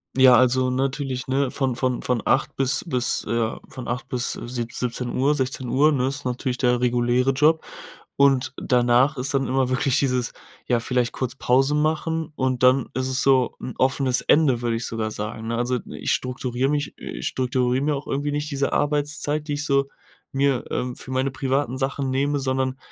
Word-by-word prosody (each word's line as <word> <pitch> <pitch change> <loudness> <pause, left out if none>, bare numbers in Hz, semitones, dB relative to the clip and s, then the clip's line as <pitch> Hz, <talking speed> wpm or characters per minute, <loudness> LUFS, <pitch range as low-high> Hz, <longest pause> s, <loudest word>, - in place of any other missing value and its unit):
Ja 130 -1 +7
also 130 +1 +3
natürlich, 130 0 -2
ne, 135 0 0
von 130 -3 -1
von 125 0 -1
von 125 -3 0
8 130 - +1
bis 135 0 +1
bis 125 -6 +1
äh, 115 -1 0
von 130 -2 -8
8 125 +2 -3
bis 125 -1 -1
sieb 120 -1 -4
17 125 0 -3
Uhr, 140 +3 +2
16 130 -2 -2
Uhr, 145 +5 +4
ne? 130 -3 +1
Ist 135 +1 -4
natürlich 125 0 -2
der 125 -1 +2
reguläre 125 +1 +2
Job. 155 +4 +3 0.5
Und 135 -2 +3
danach 125 +3 +3
ist 130 +3 -2
dann 135 -1 +1
immer 130 -1 +1
wirklich 130 +1 +1
dieses, 125 -4 0 0.3
ja, 120 -2 +2
vielleicht 125 0 0
kurz 130 0 -3
Pause 135 +3 +2
machen 155 +1 -1
und 130 -1 -1
dann 130 0 +4
ist 130 +1 -1
es 130 0 +1
so 130 -3 +3
'n 125 - -6
offenes 130 -1 +2
Ende, 140 -6 +3
würde 120 -1 0
ich 115 +1 -3
sogar 110 -1 -3
sagen, 110 +1 -5
ne? 115 - -1
Also 125 +1 0
ich - - -3
strukturiere 125 0 -1
mich 145 0 -1
ich - - -5
strukturiere 125 0 0
mir 150 0 +1
auch 140 - -6
irgendwie 145 +2 -1
nicht 150 +1 -3
diese 140 0 -1
Arbeitszeit, 150 +1 -1
die 145 - -2
ich 145 +1 -3
so, 140 -1 +2 0.4
mir, 135 -2 +1
ähm, 125 0 -3
für - - -10
meine 130 +1 0
privaten 135 0 -1
Sachen 135 0 -1
nehme, 140 +2 +1
sondern, 130 -1 -1
130 Hz, 190 wpm, -23 LUFS, 125-140 Hz, 0.5 s, Ja